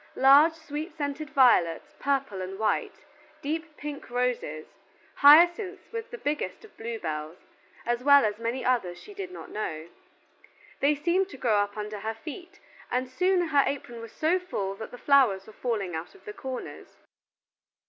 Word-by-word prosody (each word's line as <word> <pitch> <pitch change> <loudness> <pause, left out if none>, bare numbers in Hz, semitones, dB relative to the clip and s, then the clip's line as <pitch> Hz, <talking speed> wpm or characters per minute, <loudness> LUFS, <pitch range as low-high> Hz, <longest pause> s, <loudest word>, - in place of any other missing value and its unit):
Large 280 +5 +7
sweet 315 +1 -6
scented 290 0 -3
violets, 245 - +3
purple 270 -8 -1
and 185 +1 -6
white; 215 0 -1 0.4
deep 315 +2 -4
pink 290 -2 -7
roses; 240 -11 -2 0.5
hyacinths 345 +7 +5
with 460 +1 -5
the 480 - -7
biggest 300 +4 -3
of 440 - -19
blue 230 0 -5
bells; 155 -2 -5 0.5
as 240 +1 -1
well 280 -2 +7
as 210 0 -2
many 230 +3 -3
others 210 -9 0
she 415 - -12
did 395 -2 -6
not - - -10
know. 160 -6 -4 0.9
They 290 +2 +3
seemed 350 +6 +1
to - - -10
grow 225 -5 +2
up 205 +1 -2
under 210 0 -5
her 220 +2 -4
feet, 330 - -10 0.3
and 250 +1 -1
soon 355 +5 +1
her 290 -2 +5
apron 240 -4 -4
was 230 -1 -9
so 330 +4 +1
full 200 - -3
that 220 - -7
the 245 - -10
flowers 245 -9 +3
were 220 - -13
falling 210 -8 -2
out 160 - -6
of 395 - -20
the 420 - -7
corners. 260 -9 -8
265 Hz, 170 wpm, -27 LUFS, 215-315 Hz, 0.9 s, Large